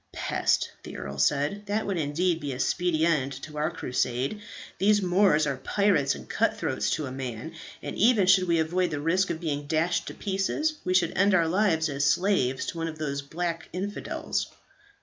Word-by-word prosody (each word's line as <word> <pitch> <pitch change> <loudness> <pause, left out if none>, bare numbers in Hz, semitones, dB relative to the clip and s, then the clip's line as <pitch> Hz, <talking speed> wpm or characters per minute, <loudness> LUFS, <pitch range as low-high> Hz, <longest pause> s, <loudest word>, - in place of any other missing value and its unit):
"Pest!" - - 0
the - - -9
earl 70 0 -6
said. 145 - +1
"That 210 +2 -1
would 195 -4 -1
indeed 165 +3 0
be 145 -3 -4
a 125 - -7
speedy 165 +1 +1
end 140 -5 +1
to 150 -1 -7
our 150 - +1
Crusade. 125 - -2 0.4
These 205 +1 +4
Moors 180 -4 +4
are 140 -2 -1
pirates 185 -4 +1
and - - -11
cut - - +1
throats - - -1
to 155 - -3
a 130 - -6
man; 130 +3 -5 0.3
and - - -5
even 220 -2 +4
should 185 0 +5
we 170 -1 +3
avoid 175 +3 +1
the 150 - -3
risk 175 +6 +1
of 165 - -2
being 145 -4 -3
dashed 165 +3 0
to - - -6
pieces, 200 +11 -1
we 185 0 0
should 175 -3 +2
end 200 +1 +4
our 170 -2 +3
lives 165 -3 +2
as 140 -1 -2
slaves 140 -4 +2
to 170 - -5
one 165 - -1
of 160 -1 -6
these 140 -2 -3
black 165 +3 -4
infidels." 200 +3 -3
165 Hz, 195 wpm, -27 LUFS, 145-190 Hz, 0.4 s, should